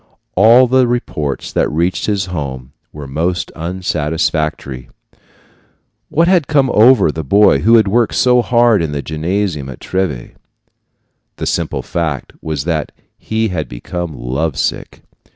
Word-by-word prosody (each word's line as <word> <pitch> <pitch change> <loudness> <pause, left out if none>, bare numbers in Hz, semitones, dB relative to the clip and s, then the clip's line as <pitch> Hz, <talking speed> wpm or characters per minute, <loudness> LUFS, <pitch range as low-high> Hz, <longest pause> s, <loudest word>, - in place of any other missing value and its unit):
All 115 +6 +6
the 130 0 +3
reports 75 - -3
that - - +1
reached 85 +6 -1
his 100 -3 0
home 70 -8 -6 0.2
were 75 -1 -9
most 85 +6 -2
unsatisfactory. 80 -6 -2 1.2
What 165 +2 +2
had 175 -6 +3
come 140 -3 +2
over 110 -5 +5
the 80 +1 -5
boy 100 +9 +4
who 115 +2 +4
had 110 -3 +4
worked 115 +2 +1
so 125 -1 +4
hard 120 -4 +3
in 80 -3 -2
the 70 -1 -3
gymnasium 80 -2 -2
at 65 - -9
Treves? 90 -11 -3 1.0
The - - -5
simple - - -2
fact 80 -6 -3
was 75 -4 -3
that 80 -2 -2 0.3
he 110 0 -1
had 80 -7 -4
became 80 +7 -6
love 65 +5 -3
sick. - - -3
85 Hz, 140 wpm, -16 LUFS, 75-110 Hz, 1.2 s, All